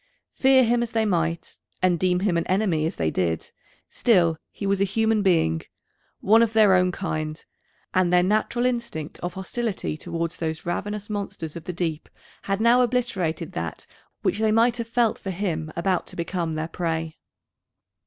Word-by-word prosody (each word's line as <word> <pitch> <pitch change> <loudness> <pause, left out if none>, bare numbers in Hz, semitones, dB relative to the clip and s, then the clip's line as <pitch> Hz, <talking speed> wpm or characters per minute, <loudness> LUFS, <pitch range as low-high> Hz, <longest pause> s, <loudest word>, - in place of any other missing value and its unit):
Fear 265 -1 +5
him 240 0 +2
as 235 -1 -3
they 225 -1 +2
might, 165 -4 -1 0.2
and 180 -2 +2
deem 180 -1 +2
him 195 -3 +1
an 170 - 0
enemy 185 -5 +1
as - - -5
they 80 -1 0
did, 85 -3 -1 0.4
still 175 -8 +3 0.2
was 200 -1 0
he - - +4
a - - +1
human 220 +2 +2
being, 160 - +2 0.6
one 220 +3 +5
of 230 -1 +2
their 215 -3 +6
own 180 0 +3
kind, 155 -4 -4 0.5
and 185 -1 +3
their 180 0 +5
natural 215 +5 +1
instinct 235 -11 -3
of 175 0 -5
hostility 190 -3 -3
towards 170 0 -4
those 160 -1 -3
ravenous 205 +4 -3
monsters 200 -6 -5
of 170 - -8
the 180 - -4
deep 165 -3 -3 0.4
had 195 0 0
now 235 +2 +5
obliterated 190 -10 -1
that 80 -1 -5 0.4
which 205 - 0
they 220 -1 +2
might 230 +2 +3
have 235 -1 -4
felt 230 -1 +1
for 195 - -6
him 170 -5 -2
about 180 +1 0
to - - -8
become 170 -1 -2
their 155 +1 -2
prey. 165 -2 -3
185 Hz, 175 wpm, -24 LUFS, 165-220 Hz, 0.6 s, their